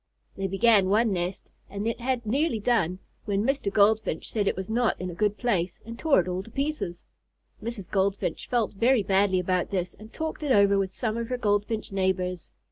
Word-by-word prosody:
They 195 0 -2
began 195 0 +4
one 215 +1 +3
nest 180 +1 -3 0.3
and 200 +1 -4
had 250 +3 -1
it - - -27
nearly 270 +2 +1
done, 200 -6 +1 0.3
when 200 -1 0
Mr. 265 -5 0
Goldfinch 210 -4 +2
said 205 -3 0
it - - +1
was 190 0 -5
not 235 +1 +1
in 180 0 -4
a - - -8
good 210 +3 0
place, 190 -8 -1
and 230 +1 -8
tore 315 -8 +4
it 180 - 0
all 180 +1 -2
to 200 - -13
pieces. 270 - -3 0.6
Mrs. 220 -4 -5
Goldfinch 195 0 -1
felt 235 -4 +1
very 230 +2 +3
badly 195 -1 +2
about 180 0 0
this 180 -2 -2
and 215 +1 -14
talked 315 0 -4
it 295 -3 -1
over 200 -3 +5
with 190 -1 -1
some 220 +2 -2
of 235 0 -3
her 250 - -1
Goldfinch 210 -1 -1
neighbors. 185 -2 -1
205 Hz, 205 wpm, -26 LUFS, 190-230 Hz, 0.6 s, over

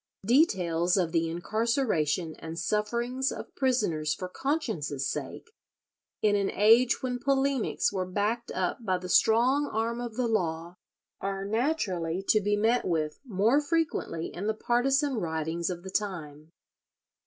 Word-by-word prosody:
Details 180 - +3
of 175 -4 +1
the 165 -1 +1
incarceration 180 - 0
and 165 0 -7
sufferings 235 +7 -1
of - - -8
prisoners 190 - +1
for 185 - -5
conscience's 180 - -2
sake, 455 - -5 0.7
in 210 -1 +4
an 200 -1 +1
age 230 +6 +4
when 250 -1 -2
polemics 275 -4 +1
were 185 -2 -2
backed 210 +5 -1
up 185 +5 -2
by 185 -4 +1
the 180 0 -7
strong 250 +9 +4
arm 230 +2 -2
of 235 -2 -6
the 250 0 0
law, 170 -6 -1 0.5
are 195 0 -3
naturally 200 - -1
to 215 - +5
be 205 +1 +1
met 225 +4 +2
with 155 -3 -1
more 230 +4 +2
frequently 295 - -2
in 195 +4 -4
the 220 - 0
partisan 270 +4 +1
writings 165 -1 -2
of 175 -1 -5
the 190 - -7
time. 160 -7 -4
205 Hz, 140 wpm, -28 LUFS, 170-245 Hz, 0.7 s, to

